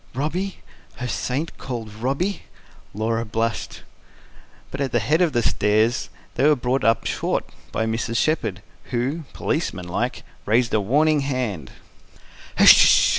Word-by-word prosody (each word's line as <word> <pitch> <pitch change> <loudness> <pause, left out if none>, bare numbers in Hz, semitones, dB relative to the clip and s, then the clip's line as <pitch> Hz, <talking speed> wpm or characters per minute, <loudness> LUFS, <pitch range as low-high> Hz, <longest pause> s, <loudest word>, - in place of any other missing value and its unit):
Robby? 175 +8 -2 0.4
Her 125 - -5
saint 135 +6 -3
called 115 -5 -6
Robby? 140 - -2 0.5
Laura 115 +2 -1
blushed. 115 +1 -3 0.9
But - - -4
at 135 -2 -1
the 120 - +2
head 150 - +1
of 175 -3 +3
the 120 -3 +1
stairs 110 +4 +1 0.2
they 135 +4 +2
were 150 - +5
brought 125 +1 -1
up 115 +2 +2
short - - -1 0.3
by 110 - -1
Mrs. 115 +1 -2
Shepherd, 110 - 0 0.2
who, 135 +6 -2
policeman 95 - -2
like, 90 - -2 0.2
raised 115 +2 +2
a 110 - +3
warning 150 +8 +3
hand. 125 - -3
120 Hz, 130 wpm, -23 LUFS, 110-145 Hz, 0.9 s, were